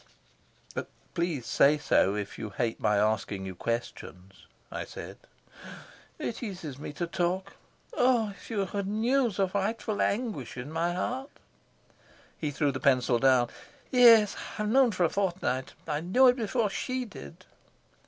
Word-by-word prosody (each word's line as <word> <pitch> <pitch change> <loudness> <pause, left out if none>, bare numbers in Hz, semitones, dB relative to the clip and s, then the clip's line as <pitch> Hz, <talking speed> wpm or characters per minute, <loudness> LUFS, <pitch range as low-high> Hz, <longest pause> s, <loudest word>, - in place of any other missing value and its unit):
"Please 170 -8 -1
say 145 +2 +4
so, 100 -8 +2
if 105 -1 -5
you 110 - -4
hate 115 +2 -2
my 105 -1 +2
asking 105 -2 0
you 95 - -5
questions," 95 -3 -5 0.2
I - - -4
said. - - -9 1.0
"It 235 - -4
eases 180 - -6
me 150 - -6
to 175 - -2
talk. 180 +3 -2 0.4
Oh, 245 - +3
if 200 - -14
you 205 -4 0 0.2
knew 235 +6 +1
the 195 -1 0
frightful 205 +2 -2
anguish 200 - -2
in 125 +5 -6
my 170 +2 0
heart." 260 +9 -3 1.1
He 150 - -3
threw 145 0 0
the 130 - -5
pencil 125 -3 +3
down. 130 -2 +4 0.4
"Yes, 230 -5 +7 0.2
I've 210 0 -1
known 260 +3 +5
it 220 - -3
for 185 - +1
a 165 - +3
fortnight. 175 -9 -1
I 150 -2 -1
knew 190 +10 +4
it 250 - +3
before 225 -2 0
she 255 +4 -2
did." 70 - -11
175 Hz, 150 wpm, -29 LUFS, -, 1.1 s, Yes